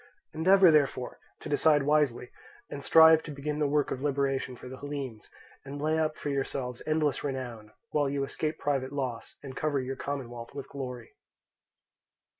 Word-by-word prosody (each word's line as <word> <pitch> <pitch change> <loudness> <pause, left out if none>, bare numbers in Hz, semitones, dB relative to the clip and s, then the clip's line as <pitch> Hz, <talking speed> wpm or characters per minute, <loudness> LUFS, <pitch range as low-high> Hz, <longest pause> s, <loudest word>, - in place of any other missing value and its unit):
Endeavour, 185 +2 +6
therefore, 140 -4 +1 0.2
to - - -7
decide 145 0 +3
wisely, 145 -4 +1 0.4
and 140 - -6
strive 160 0 +7
to - - -10
begin 150 +1 -4
the 150 - +2
work 145 0 +1
of 130 - -3
liberation 135 -2 -1
for 125 - -11
the 130 +1 -8
Hellenes, 140 -6 -6 0.3
and 140 +1 -7
lay 155 +2 +1
up 155 -1 0
for - - -4
yourselves 135 -2 -3
endless 155 -2 +1
renown, 125 -6 -5 0.2
while 145 -2 +1
you 140 0 -1
escape 155 +3 -3
private 135 -2 -1
loss, 130 -5 -4
and 135 -2 -8
cover 150 -2 0
your 130 +1 -4
commonwealth 125 -3 -6
with 140 - -6
glory." 125 -4 -7
140 Hz, 165 wpm, -29 LUFS, 130-150 Hz, 0.4 s, strive